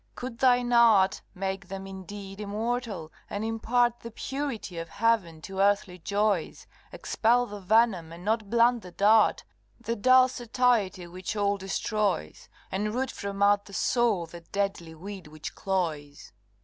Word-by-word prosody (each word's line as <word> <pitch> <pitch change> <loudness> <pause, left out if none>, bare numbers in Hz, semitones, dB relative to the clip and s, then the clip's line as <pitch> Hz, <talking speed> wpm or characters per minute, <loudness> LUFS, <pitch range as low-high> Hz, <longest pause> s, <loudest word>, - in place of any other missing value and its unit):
could 245 -2 -7
thine 245 -1 +3
art 220 -5 +5
Make 190 -1 -4
them 195 +1 -6
indeed 195 +1 -8
immortal, 210 -5 -3 0.2
and 205 +2 -3
impart 240 +2 +1
The 230 - -8
purity 240 -7 -4
of 165 - -6
heaven 200 -8 0
to 190 +3 -6
earthly 200 -2 +2
joys, 200 -1 -1 0.3
Expel 240 +2 +1
the 205 -3 -8
venom 195 -4 +2
and 170 +2 -10
not 215 -1 0
blunt 235 +1 +3
the 180 - -10
dart 210 +4 +4 0.4
The 230 - -3
dull 255 +3 +6
satiety 240 -7 0
which 185 +4 -6
all 205 -1 +1
destroys 195 - -2 0.2
And 210 +3 -2
root 265 +1 -1
from 200 0 -3
out 205 0 +4
the 200 - -13
soul 225 -6 +1
the 170 +1 -11
deadly 175 -2 -3
weed 190 0 -8
which 155 0 -8
cloys? 160 -6 -3
205 Hz, 150 wpm, -27 LUFS, 185-230 Hz, 0.4 s, dull